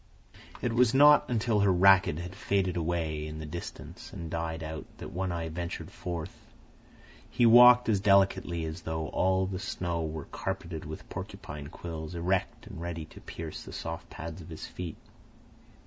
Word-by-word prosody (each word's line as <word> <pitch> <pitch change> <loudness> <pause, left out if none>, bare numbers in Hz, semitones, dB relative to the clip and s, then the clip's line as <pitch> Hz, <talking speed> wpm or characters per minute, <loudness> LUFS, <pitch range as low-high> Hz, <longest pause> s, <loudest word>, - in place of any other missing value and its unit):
It 120 - 0
was 120 +1 +4
not 150 +1 +7
until 115 -2 +1
her 100 -1 +4
racket 95 -3 +5
had 90 +2 -6
faded 95 -2 0
away 80 -3 -1
in 75 0 -6
the 80 - -6
distance 85 +3 -8
and 80 -1 -7
died 80 0 -3
out 80 0 -6
that - - -8
One 95 +1 -2
Eye 85 -1 -3
ventured 85 +2 -5
forth. 85 -3 -5 0.9
He 120 - +2
walked 125 +1 +8
as 105 -3 +3
delicately 95 -4 +3
as 80 +2 -5
though 80 -1 -3
all 95 0 +2
the 95 -1 -4
snow 90 -6 -2
were 80 -1 -4
carpeted 90 -4 -5
with 80 +1 -8
porcupine 70 -1 -7
quills, 80 +1 -7
erect 95 +5 -1
and 100 -6 -9
ready 85 -2 -4
to - - -14
pierce 80 -2 -7
the - - -10
soft - - -6
pads 80 +2 -7
of 80 - -11
his 80 - -7
feet. 85 -3 -7
85 Hz, 170 wpm, -29 LUFS, 80-95 Hz, 0.9 s, walked